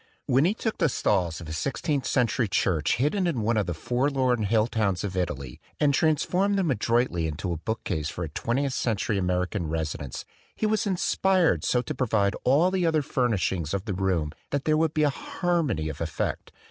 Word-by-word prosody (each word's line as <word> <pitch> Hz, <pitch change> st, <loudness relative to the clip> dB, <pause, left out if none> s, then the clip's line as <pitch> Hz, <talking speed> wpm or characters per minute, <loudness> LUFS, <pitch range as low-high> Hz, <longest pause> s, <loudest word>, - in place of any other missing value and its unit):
When 135 Hz, +5 st, +3 dB
he 195 Hz, +5 st, +2 dB
took 225 Hz, -1 st, -3 dB
the 165 Hz, -, +3 dB
stalls 90 Hz, -, 0 dB
of 80 Hz, -, -8 dB
a 80 Hz, -, -5 dB
sixteenth 140 Hz, -, -1 dB
century 120 Hz, -2 st, +1 dB
church 85 Hz, -5 st, +1 dB
hidden 165 Hz, -, +1 dB
in 140 Hz, -9 st, -1 dB
one 115 Hz, +2 st, +1 dB
of 105 Hz, -3 st, +1 dB
the 85 Hz, -, -2 dB
forlorn 125 Hz, -, +1 dB
hill 110 Hz, +1 st, +3 dB
towns 105 Hz, -6 st, -1 dB
of 95 Hz, -2 st, -4 dB
Italy 70 Hz, -9 st, -3 dB, 0.2 s
and 145 Hz, -1 st, +3 dB
transformed 180 Hz, +7 st, +2 dB
them 180 Hz, -6 st, +1 dB
adroitly 115 Hz, -9 st, +1 dB
into 85 Hz, +4 st, -3 dB
a 85 Hz, -, -2 dB
bookcase 80 Hz, -5 st, -3 dB
for 90 Hz, -, -5 dB
a 80 Hz, -, -4 dB
twentieth 130 Hz, -, -1 dB
century 110 Hz, -4 st, 0 dB
American 90 Hz, 0 st, -1 dB
residence, 75 Hz, -4 st, -4 dB, 0.3 s
he -, -, -1 dB
was 215 Hz, -1 st, +1 dB
inspired 190 Hz, -1 st, +2 dB
so 125 Hz, 0 st, +1 dB
to -, -, -4 dB
provide 105 Hz, -5 st, +1 dB
all 150 Hz, +8 st, +4 dB
the 185 Hz, -1 st, 0 dB
other 160 Hz, -3 st, +2 dB
furnish 120 Hz, -7 st, 0 dB
ings 85 Hz, -2 st, -2 dB
of 100 Hz, +1 st, -4 dB
the 105 Hz, -, -2 dB
room 90 Hz, -5 st, 0 dB, 0.2 s
that 145 Hz, -1 st, -2 dB
there 155 Hz, -, +3 dB
would 160 Hz, 0 st, +1 dB
be 155 Hz, -, +3 dB
a 145 Hz, -, +3 dB
harmony 150 Hz, -, -1 dB
of 80 Hz, 0 st, -6 dB
effect. 80 Hz, -1 st, -3 dB
115 Hz, 200 wpm, -26 LUFS, 90-150 Hz, 0.3 s, all